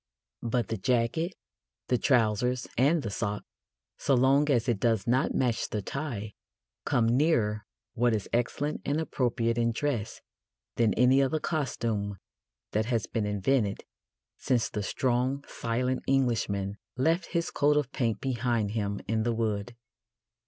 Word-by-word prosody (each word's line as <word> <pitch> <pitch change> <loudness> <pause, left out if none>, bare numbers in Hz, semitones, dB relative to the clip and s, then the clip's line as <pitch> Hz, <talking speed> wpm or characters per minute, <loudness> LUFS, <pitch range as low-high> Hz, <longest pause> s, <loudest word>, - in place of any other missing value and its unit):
But 120 0 -1
the 115 - -1
jacket, 125 - 0 0.5
the 125 - +2
trousers, 125 0 +2
and 145 +6 +3
the 105 - -3
sock 105 0 -2 0.6
so 135 - +2
long 135 +4 +4
as 125 -3 +2
it 120 -5 +1
does 115 -2 +1
not 125 +3 +1
match 125 -3 0
the 105 -2 -3
tie 115 -6 -4 0.5
come 120 - +2
nearer 110 - +1 0.3
what 120 -1 +2
is 105 - -3
excellent 135 +5 -1
and 145 +2 0
appropriate 120 -6 0
in 115 0 +2
dress 115 -3 -2 0.6
than 115 -4 +2
any 125 +3 +5
other 135 +3 +1
costume 115 - -2 0.5
that 110 +1 +1
has 115 -4 0
been 110 -3 -2
invented 105 +1 0 0.6
since 125 -3 +1
the 105 - -2
strong 130 +5 0
silent 125 +3 -1
Englishman 110 -7 0 0.2
left 165 +7 +2
his 170 -1 0
coat 150 +1 +3
of 140 -3 0
paint 115 -6 -1
behind 120 -5 0
him 100 -2 -2
in 110 +1 +1
the 120 +1 0
wood. 110 0 -2
120 Hz, 145 wpm, -29 LUFS, 110-135 Hz, 0.6 s, any